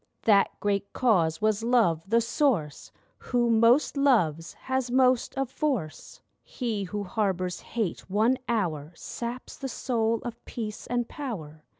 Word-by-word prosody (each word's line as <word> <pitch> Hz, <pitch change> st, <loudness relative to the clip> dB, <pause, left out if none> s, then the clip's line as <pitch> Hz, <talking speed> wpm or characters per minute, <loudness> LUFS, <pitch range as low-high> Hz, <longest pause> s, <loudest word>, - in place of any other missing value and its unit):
That 200 Hz, -3 st, +5 dB
great 200 Hz, -1 st, -1 dB
Cause 185 Hz, -7 st, +2 dB
was 215 Hz, -1 st, +2 dB
Love, 225 Hz, -9 st, +3 dB
the 230 Hz, +1 st, +4 dB
Source 230 Hz, -, 0 dB, 0.3 s
Who 240 Hz, -2 st, +1 dB
most 230 Hz, +7 st, +4 dB
loves 175 Hz, -, +2 dB
has 260 Hz, -1 st, -2 dB
most 255 Hz, 0 st, +2 dB
of 270 Hz, 0 st, 0 dB
Force. 255 Hz, -, -3 dB, 0.2 s
He 220 Hz, -6 st, -3 dB
who 205 Hz, +2 st, -4 dB
harbours 190 Hz, -4 st, -1 dB
Hate 215 Hz, -7 st, -4 dB
one 225 Hz, +7 st, +2 dB
hour 170 Hz, -9 st, -1 dB
Saps 240 Hz, +7 st, -6 dB
the 270 Hz, -, -5 dB
soul 230 Hz, -2 st, 0 dB
of 235 Hz, -1 st, -7 dB
Peace 215 Hz, -3 st, -6 dB
and 240 Hz, -1 st, -1 dB
Power. 160 Hz, -, -7 dB
225 Hz, 135 wpm, -27 LUFS, 190-245 Hz, 0.3 s, That